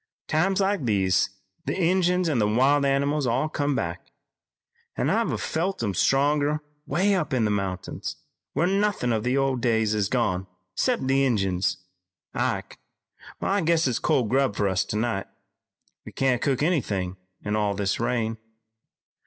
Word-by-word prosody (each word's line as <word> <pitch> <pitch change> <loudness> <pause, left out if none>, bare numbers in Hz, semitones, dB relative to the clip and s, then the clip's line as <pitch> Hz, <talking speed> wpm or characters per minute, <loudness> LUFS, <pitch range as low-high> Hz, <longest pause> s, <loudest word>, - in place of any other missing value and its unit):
"Times 190 +5 +1
like 195 -7 +1
these, 95 -4 +2 0.4
the - - -1
Injuns 180 0 +2
an' 145 -7 +1
the 105 - +3
wild 135 +6 +3
animals 140 +1 +1
all 130 +6 +1
come 145 -2 -1
back, 85 -3 -4 0.9
an' - - +1
I've - - 0
felt 175 -3 -2
'em 100 -3 0
still - - +1
stronger 145 +2 +2 0.3
way 190 +8 +2
up 155 -7 0
in 115 -3 +2
the 105 - +1
mountains, 95 -3 -3 0.4
where 170 - +1
nothin' 195 - +1
of 110 -1 -1
the 125 +2 +1
old 135 -2 +1
days 110 -3 +2
is 105 -2 0
gone 95 -7 0 0.3
'cept 250 - 0
the 135 +1 +3
Injuns. 95 -7 +1 0.6
Ike, - - -2 0.6
I 200 +1 +1
guess 165 -2 +2
it's 125 - 0
cold 125 -4 +1
grub 130 -4 +2
for 100 - +1
us 95 +1 +1
tonight. 105 -2 -2 0.8
We - - -10
can't 130 -3 +1
cook 140 0 +1
anythin' 100 - -1 0.3
in 105 0 -1
all 105 -2 0
this 100 0 -1
rain. 115 -2 -1
130 Hz, 160 wpm, -25 LUFS, 105-155 Hz, 0.9 s, the